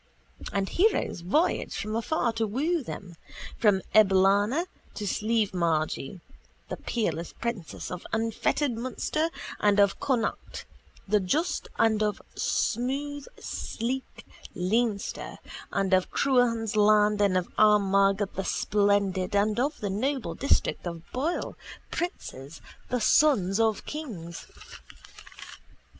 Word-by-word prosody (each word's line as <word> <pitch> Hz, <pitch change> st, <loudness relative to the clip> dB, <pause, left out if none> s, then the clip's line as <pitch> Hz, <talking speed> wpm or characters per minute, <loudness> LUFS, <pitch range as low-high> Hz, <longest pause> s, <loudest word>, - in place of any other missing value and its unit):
And 195 Hz, -1 st, 0 dB
heroes 375 Hz, -, +1 dB
voyage 305 Hz, -, +1 dB
from 215 Hz, 0 st, -3 dB
afar 235 Hz, 0 st, 0 dB
to 225 Hz, -1 st, -1 dB
woo 300 Hz, +10 st, 0 dB
them, 185 Hz, -8 st, -8 dB, 0.4 s
from 200 Hz, -4 st, +3 dB
Eblana 205 Hz, -, +4 dB, 0.3 s
to 210 Hz, -, -5 dB
Slievemargy, 185 Hz, -8 st, 0 dB, 0.5 s
the -, -, -4 dB
peerless 170 Hz, -8 st, -2 dB
princes 235 Hz, -8 st, -5 dB
of 180 Hz, -1 st, -6 dB
unfettered 225 Hz, +5 st, 0 dB
Munster 255 Hz, +7 st, -2 dB, 0.3 s
and 205 Hz, -1 st, +3 dB
of 200 Hz, -1 st, +3 dB
Connacht 255 Hz, -5 st, -2 dB, 0.4 s
the 210 Hz, +1 st, +3 dB
just 295 Hz, -, -1 dB
and 220 Hz, -1 st, +3 dB
of 210 Hz, -1 st, 0 dB
smooth 275 Hz, +4 st, -1 dB
sleek 255 Hz, +4 st, -4 dB, 0.3 s
Leinster 210 Hz, +3 st, -1 dB, 0.3 s
and 195 Hz, -1 st, 0 dB
of 185 Hz, 0 st, +3 dB
Cruachan's 235 Hz, -5 st, +2 dB
land 210 Hz, 0 st, +4 dB
and 195 Hz, -2 st, +3 dB
of 180 Hz, -, -1 dB
Armagh 200 Hz, -1 st, +4 dB
the 195 Hz, -, -2 dB
splendid 200 Hz, -2 st, +1 dB
and 210 Hz, +2 st, +2 dB
of 285 Hz, +4 st, -1 dB
the 205 Hz, -2 st, -2 dB
noble 265 Hz, +6 st, -1 dB
district 275 Hz, -8 st, 0 dB
of 170 Hz, -1 st, -6 dB
Boyle, 300 Hz, +7 st, -2 dB, 0.4 s
princes, 165 Hz, -, -5 dB, 0.3 s
the 250 Hz, -, 0 dB
sons 215 Hz, -8 st, +4 dB
of 220 Hz, -2 st, +1 dB
kings. 195 Hz, -, -7 dB
210 Hz, 115 wpm, -27 LUFS, 195-250 Hz, 0.5 s, Eblana